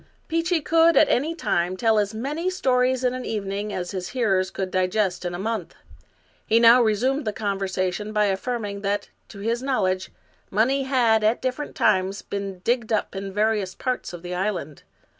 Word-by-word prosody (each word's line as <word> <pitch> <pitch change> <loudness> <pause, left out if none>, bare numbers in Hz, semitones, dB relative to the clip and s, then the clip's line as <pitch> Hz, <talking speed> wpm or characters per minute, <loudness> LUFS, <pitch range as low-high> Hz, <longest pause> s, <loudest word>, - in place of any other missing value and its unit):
Peechy 330 0 0
could, 330 +2 +4
at 310 - +6
any 310 +6 +1
time, 180 - -1
tell 220 0 +3
as 205 -1 0
many 290 +11 -2
stories 260 -7 +1
in 250 0 +2
an 255 0 -5
even 205 -4 -3
ing 205 +1 -3
as 180 -2 -4
his 185 -2 -4
hearers 195 -7 +1
could 190 -1 -4
digest 185 0 0
in 175 0 -2
a - - -4
month. 220 +4 -3 0.7
He 225 - +4
now 235 +2 +7
resumed 245 +6 +1
the 215 - -1
conversation 195 -1 -2
by 210 -1 +2
affirming 205 0 -2
that, 200 0 -2 0.2
to 200 - -10
his 230 +3 -1
knowledge, 190 -9 0 0.4
money 240 +7 +2
had, 235 -5 +3
at 220 +3 +2
different 260 +3 -3
times, 195 -2 +1
been 195 -2 -5
digged 235 -2 0
up 215 -2 0
in 195 0 -5
various 210 -2 0
parts 255 -1 -3
of 175 -1 -9
the 180 0 -5
island. 180 -6 -3
215 Hz, 180 wpm, -24 LUFS, 195-250 Hz, 0.7 s, now